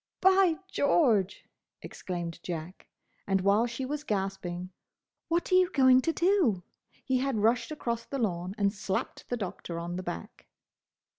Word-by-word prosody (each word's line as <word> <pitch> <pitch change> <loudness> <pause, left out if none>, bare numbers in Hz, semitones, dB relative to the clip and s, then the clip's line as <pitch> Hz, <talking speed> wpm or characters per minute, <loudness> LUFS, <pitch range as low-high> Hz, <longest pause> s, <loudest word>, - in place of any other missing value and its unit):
"By 380 -2 +5
George!" 240 - +2 0.4
exclaimed 175 -2 -5
Jack; 170 +1 -6 0.4
and 195 -1 +2
while 200 +5 +3
she 240 +3 -4
was 295 +2 -4
gasping, 190 -5 -3 0.6
"What 340 +2 0
are - - +5
you 370 -1 +5
going 260 -4 +5
to 330 - +1
do?" 335 - +2 0.4
he 260 -1 +1
had 270 -2 0
rushed 230 +3 +2
across 235 -6 -3
the 275 - -4
lawn 185 -5 -2
and 200 -1 +2
slapped 190 -2 -4
the 245 - -1
Doctor 180 -4 -5
on 170 +1 -4
the - - -3
back. 85 - -7
220 Hz, 150 wpm, -29 LUFS, 185-275 Hz, 0.6 s, By